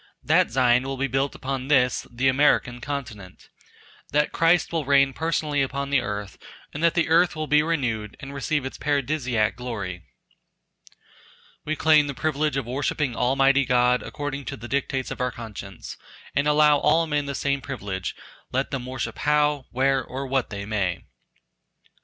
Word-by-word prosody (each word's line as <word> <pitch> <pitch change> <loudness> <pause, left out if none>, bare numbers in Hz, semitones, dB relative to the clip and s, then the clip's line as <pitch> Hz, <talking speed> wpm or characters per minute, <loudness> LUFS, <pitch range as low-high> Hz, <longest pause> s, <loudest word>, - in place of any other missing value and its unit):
That - - +3
Zion 125 0 +3
will 135 +1 -4
be 135 - 0
built 135 +1 -1
upon 135 0 -4
this 125 -4 +2
[the 125 +2 0
American] 130 -3 +2
continent. 110 -10 -7 0.6
That 150 +1 +1
Christ 165 +1 +3
will 165 -2 0
reign 140 -1 +4
personally 155 -2 -1
upon 140 +1 -2
the 140 -3 +3
earth, 105 -3 -5 0.3
and 150 - -5
that 170 0 +3
the 175 - +2
earth 170 +2 +3
will 155 0 -3
be 150 0 +4
renewed 125 -10 -2
and 140 0 -8
receive 140 0 -1
its 135 - -6
paradisiac 135 -6 0
glory. 105 -8 -5 1.6
We 155 - -1
claim 155 -1 +4
the 140 - -5
privilege 150 -1 0
of 135 - -2
worshipping 135 +1 -1
Almighty 135 +2 +3
God 125 -1 +3
according 145 -2 -5
to - - -5
the 120 - -9
dictates 135 0 -2
of - - -5
our 125 0 0
conscience, 105 -6 -9 0.4
and 145 +1 +2
allow 150 -1 +5
all 165 0 +3
men 145 -2 -1
the 140 - -3
same 140 -1 -1
privilege 100 -10 -5 0.4
let 135 +2 -1
them 125 -2 -4
worship 120 -3 -4
how, 150 -2 +2
where, 135 +1 +1
or 130 +3 -6
what 135 -2 -1
they 100 -1 -6
may. 100 -5 -1
135 Hz, 165 wpm, -24 LUFS, 125-145 Hz, 1.6 s, allow